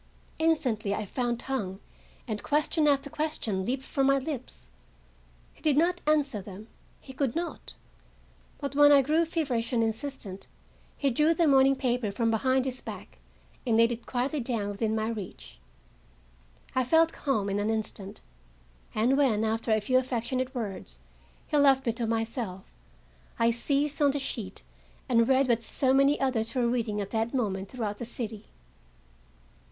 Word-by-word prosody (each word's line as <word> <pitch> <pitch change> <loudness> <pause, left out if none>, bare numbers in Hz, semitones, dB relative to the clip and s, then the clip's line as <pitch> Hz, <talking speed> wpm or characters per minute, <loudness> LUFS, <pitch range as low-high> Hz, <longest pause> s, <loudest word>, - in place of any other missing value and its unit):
Instantly 250 -11 +1
I 215 - -3
found 240 +3 -2
tongue, 205 -9 -3 0.5
and 215 -3 -3
question 300 +1 +1
after 285 -1 +2
question 230 -11 -2
leaped 260 +2 -1
from 270 0 0
my 275 0 +4
lips. 270 -2 -6 0.9
He - - -23
did 300 -3 +2
not 350 +3 +2
answer 285 -8 +2
them; 200 +3 -11 0.3
he 265 - -12
could 270 -1 -1
not; 340 +1 -4 0.8
but 280 -1 -5
when 290 0 +7
I 280 -1 +7
grew 315 +5 +2
feverish 275 -9 -1
and 235 -2 +2
insistent, 220 -4 -5 0.5
he 280 -2 +1
drew 305 +7 +3
the 340 - +3
morning 270 -2 +5
paper 245 -5 -1
from 230 +2 0
behind 260 +3 +2
his 260 -1 -3
back, - - -9 0.4
and 230 -3 +2
laid 230 +1 +5
it 235 0 -6
quietly 260 +4 -1
down 230 -5 -2
within 215 +2 -1
my 220 0 -1
reach. 195 - -7 1.1
I 255 - +2
felt 325 +5 +4
calmed 215 -8 -1
in 200 - 0
an 205 +1 0
instant, 215 -3 -4 0.7
and 235 +5 +3
when, 235 -7 +3
after 225 +1 -1
a 220 - +4
few 255 +5 +2
affectionate 255 +1 -2
words, 195 - -5 0.5
he 300 - +1
left 275 -2 +5
me 230 - +1
to 230 -1 -3
myself, 225 -4 -3 0.7
I 230 0 +3
seized 280 +5 -1
on 290 - +5
the 280 - 0
sheet 240 -7 -4 0.4
and 230 -3 +3
read 265 0 +4
what 235 -2 +2
so 260 +3 +2
many 275 +2 +4
others 250 -3 -1
were 250 -2 +2
reading 230 -3 -1
at 200 - -6
that 225 +3 -1
moment 195 -6 -1
throughout 215 -5 -4
the 240 - -5
city. 225 -3 -5
245 Hz, 165 wpm, -28 LUFS, 220-275 Hz, 1.1 s, when